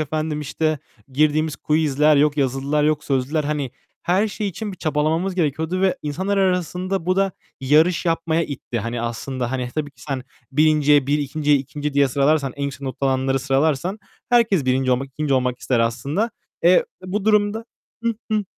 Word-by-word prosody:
efendim, 155 0 -2
işte, 155 +1 -1 0.3
girdiğimiz 155 +1 +2
quizler, 150 -1 +2
yok 150 +1 +3
yazılılar, 140 +2 0
yok 150 -1 +1
sözlüler. 140 +3 0
Hani 145 -4 -2 0.3
her 195 +5 +2
şey 205 0 -3
için 205 +3 -5
bir 185 - -9
çabalamamız 160 +4 0
gerekiyordu 160 +2 -1
ve 190 -1 +2
insanlar 190 +7 -2
arasında 180 0 0
bu 185 +1 +2
da 195 -1 +2 0.3
yarış 160 +6 +3
yapmaya 165 0 +1
itti. 130 -5 -5
Hani, 115 +2 -3
aslında, 120 +1 -3
hani, 125 -2 -2
tabii 150 -2 -2
ki - - -19
sen 135 -3 -3 0.3
1'inciye 150 -2 +4
1, 145 +1 +2
2'nciye 145 +1 +1
2. 145 +2 -4
diye 140 -1 +4
sıralarsan, 140 +1 +2
en 140 - -5
yüksek 140 0 -5
not 135 -2 -5
alanları 135 0 +1
sıralarsan 145 +8 0 0.3
herkes 230 - +3
1. 130 0 +1
olmak, 130 +2 +1
2. 140 0 -1
olmak 125 -1 0
ister 120 -3 0
aslında. 140 - 0 0.3
E, - - +7
d 185 - +5 0.2
bu 200 +2 -2
durumda 210 +1 +2 0.4
Hı, 230 -1 +1 0.2
hı, 210 -1 +1
150 Hz, 170 wpm, -21 LUFS, 135-175 Hz, 0.4 s, E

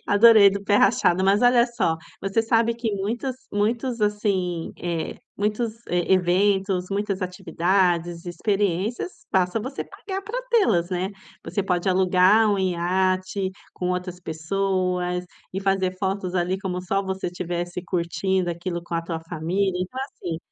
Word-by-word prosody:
Adorei, 210 -1 +7
do 200 +1 -4
pé 205 0 +3
rachado, 190 -3 +3
mas 200 +3 +3
olha 245 -1 +5
só, 235 -9 0 0.2
você 195 +3 +1
sabe 230 +1 +2
que 230 -2 -2
muitos 230 +6 -2 0.2
muitos, 230 +4 0
assim, 200 -5 0
eh 170 -2 -3 0.2
muitos, 210 +3 -1 0.2
e 175 +1 +1
eventos, 190 +1 +2
muitas 200 -1 -1
atividades, 175 -1 0
experiências, 200 - -1
basta 185 +3 +1
você 260 +5 -5
pagar 385 -1 -6
para 480 +5 -4
te-las, 215 - +3
né. 185 +1 -1 0.3
Você 200 - -1
pode 180 -1 0
alugar 190 +3 +4
um 200 - 0
iate 185 +1 0 0.2
com 180 0 -2
outras 180 0 -3
pessoas 180 +1 -1 0.3
e 190 - -3
fazer 195 -1 0
fotos 190 -1 -2
ali 180 +1 0
como 180 -2 -3
só 195 +2 0
você 190 -1 -3
tivesse 175 0 -4
curtindo 180 +1 0
aquilo 170 0 -4
com 170 - -6
a 165 - -1
tua 165 -1 -4
família, 180 +3 -1
então 220 +9 -4
assim, 170 - -6
190 Hz, 145 wpm, -24 LUFS, 180-205 Hz, 0.3 s, Adorei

